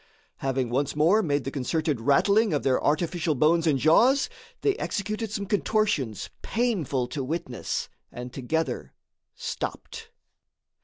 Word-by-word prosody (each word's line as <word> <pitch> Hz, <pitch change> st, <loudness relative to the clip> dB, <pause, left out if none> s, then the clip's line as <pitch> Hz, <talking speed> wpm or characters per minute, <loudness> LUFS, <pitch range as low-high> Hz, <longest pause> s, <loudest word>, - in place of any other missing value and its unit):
Having 130 Hz, -3 st, -1 dB
once 135 Hz, +3 st, 0 dB
more 170 Hz, +9 st, +4 dB
made 145 Hz, -7 st, 0 dB
the 135 Hz, -, -4 dB
concerted 145 Hz, -1 st, -1 dB
rattling 200 Hz, -, +3 dB
of 145 Hz, -, 0 dB
their 130 Hz, -1 st, +2 dB
artificial 160 Hz, +1 st, +1 dB
bones 160 Hz, +5 st, +3 dB
and 145 Hz, -3 st, +3 dB
jaws, 245 Hz, -, +4 dB, 0.3 s
they 410 Hz, -, +2 dB
executed 215 Hz, -, -3 dB
some 200 Hz, -1 st, -3 dB
contortions 205 Hz, -, 0 dB
painful 180 Hz, -, 0 dB
to 140 Hz, +1 st, -3 dB
witness 145 Hz, -3 st, -3 dB, 0.2 s
and 125 Hz, 0 st, -7 dB
together 160 Hz, +5 st, -2 dB, 0.4 s
stopped. 455 Hz, -2 st, -5 dB
155 Hz, 125 wpm, -26 LUFS, 135-205 Hz, 0.4 s, more